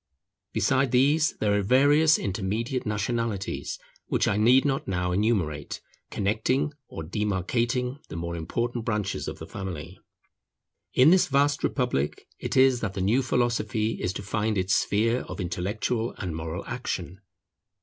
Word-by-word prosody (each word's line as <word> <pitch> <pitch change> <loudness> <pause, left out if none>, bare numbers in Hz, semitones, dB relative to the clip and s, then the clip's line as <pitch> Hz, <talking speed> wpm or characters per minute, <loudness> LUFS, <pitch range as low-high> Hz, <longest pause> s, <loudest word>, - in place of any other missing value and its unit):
Besides 130 +5 +2
these, 145 +6 +3
there 105 -1 +1
are 105 - +2
various 145 +8 +5
intermediate 110 +6 -2
nationalities 105 -1 -2 0.3
which - - +1
I - - +2
need 120 +6 +5
not 135 -1 0
now 90 -1 -1
enumerate, 90 -7 0 0.3
connecting 110 +8 0
or 80 - -7
demarcating 115 - -1
the - - -8
more 85 +1 -4
important 120 +8 -2
branches 105 -4 -2
of - - -5
the - - -8
family. 90 -5 -7 1.0
In 130 +6 +7
this 185 0 +5
vast 145 +1 +2
Republic 125 - -1
it - - -2
is 130 -1 +5
that 100 -3 -3
the - - -3
new 110 +8 +3
philosophy 115 -3 0
is 90 - 0
to 100 - -6
find 110 +1 -1
its 95 +1 +1
sphere 115 +4 +2
of - - -7
intellectual 105 +6 -2
and 90 -5 -4
moral 80 0 -5
action. 95 +3 -4
110 Hz, 145 wpm, -26 LUFS, 95-125 Hz, 1.0 s, In